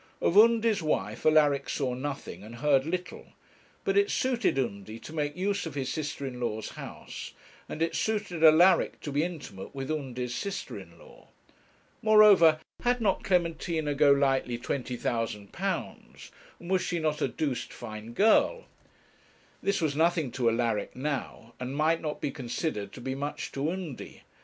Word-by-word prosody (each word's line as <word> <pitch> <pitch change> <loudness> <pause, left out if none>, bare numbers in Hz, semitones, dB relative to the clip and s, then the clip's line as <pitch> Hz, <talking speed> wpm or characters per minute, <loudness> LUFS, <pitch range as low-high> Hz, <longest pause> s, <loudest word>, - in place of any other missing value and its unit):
Of 170 - +1
Undy's 225 -1 +5
wife 110 -7 -1
Alaric 145 -3 +4
saw 130 -4 -1
nothing 140 +2 -5
and 110 +3 -10
heard 140 +2 +2
little, 180 +1 -5 0.5
but 395 -1 0
it 405 0 +4
suited 250 - +1
Undy 110 -4 -3
to 135 +7 -11
make 150 0 -2
use 200 -1 -1
of 150 - -8
his 130 -2 -2
sister 145 -2 -4
in 125 -2 -6
law's 110 -3 -3
house, - - -8 0.4
and 160 - -2
it 165 - -1
suited 205 -7 -1
Alaric 170 +3 +6
to 145 - -5
be 145 +1 +1
intimate 145 - -7
with 135 +1 -4
Undy's 125 -5 -3
sister 200 +8 -4
in - - -14
law. - - -17 0.7
Moreover, 210 -8 +7 0.2
had 245 0 +2
not 205 -5 +1
Clementina 165 -4 0
Golightly 140 -3 +3
£20,000, 120 -4 -4 0.3
and 175 +2 -8
was 190 -1 +3
she 175 - -2
not 155 -2 -1
a - - +2
'doosed 145 -6 -3
fine 110 0 -8
girl?' 225 - +3 1.0
This 195 -1 0
was 150 -3 0
nothing 165 -3 +2
to 120 -2 +1
Alaric 115 -2 -1
now, 130 -4 -4
and 130 +2 -4
might 160 +2 +2
not 150 -2 -4
be 140 - -2
considered 120 - -3
to - - -9
be 130 +2 -3
much 145 +2 -4
to 140 +3 -1
Undy. 175 -7 -6
150 Hz, 155 wpm, -28 LUFS, 125-175 Hz, 1.0 s, Moreover